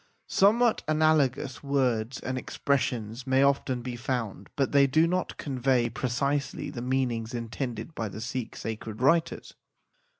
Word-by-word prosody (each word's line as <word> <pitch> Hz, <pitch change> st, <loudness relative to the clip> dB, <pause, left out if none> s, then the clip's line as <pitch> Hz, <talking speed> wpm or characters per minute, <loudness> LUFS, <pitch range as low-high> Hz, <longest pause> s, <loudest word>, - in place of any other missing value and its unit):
Somewhat 220 Hz, +4 st, +4 dB
analogous 150 Hz, -4 st, +2 dB
words 130 Hz, -4 st, 0 dB
and 130 Hz, -, -3 dB
ex 130 Hz, -, -6 dB
pressions 125 Hz, -3 st, -1 dB
may 130 Hz, +1 st, +4 dB
often 135 Hz, -3 st, +1 dB
be 125 Hz, -1 st, -4 dB
found, 120 Hz, -6 st, -3 dB
but 135 Hz, -2 st, +1 dB
they 140 Hz, -1 st, +5 dB
do 155 Hz, +5 st, +4 dB
not 180 Hz, +2 st, -1 dB
con 135 Hz, -3 st, -4 dB
vey 125 Hz, -2 st, +2 dB
precisely 140 Hz, +4 st, -1 dB
the 125 Hz, -5 st, -6 dB
meanings 125 Hz, -2 st, -1 dB
intended 120 Hz, +4 st, -4 dB
by 110 Hz, -7 st, -3 dB
the 105 Hz, -, -8 dB
Sikh 125 Hz, +1 st, -4 dB
sacred 110 Hz, -1 st, -6 dB
writers. 165 Hz, +6 st, +1 dB
130 Hz, 145 wpm, -28 LUFS, 120-140 Hz, -, they